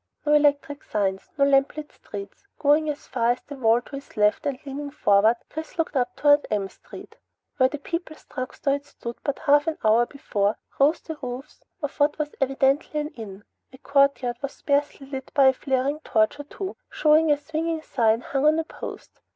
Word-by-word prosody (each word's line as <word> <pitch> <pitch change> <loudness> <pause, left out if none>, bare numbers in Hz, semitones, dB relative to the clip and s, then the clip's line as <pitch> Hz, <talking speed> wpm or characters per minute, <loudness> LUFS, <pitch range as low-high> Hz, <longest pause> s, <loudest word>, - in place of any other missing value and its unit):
No 295 - +3
electric 290 -1 +2
signs, 195 -2 -2
no 280 - +4
lamplit 280 +2 +1
streets. 200 - -10
Going 300 +2 +3
as 290 -1 -5
far 240 -1 +1
as 245 - -12
the 290 - -10
wall 235 -2 +3
to 275 +3 -8
his 275 -4 -13
left 210 +7 +2
and 275 -2 -1
leaning 285 +1 -5
forward, 215 -5 +4 0.2
Chris 315 +2 -7
looked 325 -2 -1
up 245 -2 0
toward 290 0 +4
M 200 -2 -1
Street. - - -13 0.4
Where 260 -2 +4
the 295 - -5
People's 335 +2 -6
Drugstore 265 +1 -2
had 285 0 -3
stood 235 -4 -8
but 285 - -1
a - - -14
half 290 +2 +4 0.2
hour 225 +2 +5
before, 210 -7 -1 0.2
rose 290 +4 +4
the 320 -2 -7
roofs 255 +3 -7 0.2
of 290 +1 -4
what 290 +1 +3
was 300 -1 -3
evidently 270 +3 +1
an 300 0 -2
inn. 210 -8 -10 0.3
A 260 - -13
courtyard 275 -3 +2
was 280 -1 -4
sparsely 285 -1 -1
lit 265 -1 -7
by 275 -2 +7
a - - +2
flaring 270 +3 -1
torch 220 -2 +1
or 290 - -6
two, 380 +5 -6
showing 310 +1 +4
a 290 - +4
swinging 320 +2 -3
sign 230 -4 +2
hung 275 +3 0
on 310 +1 +4
a 325 - +1
post. - - -9
280 Hz, 195 wpm, -25 LUFS, 245-295 Hz, 0.4 s, by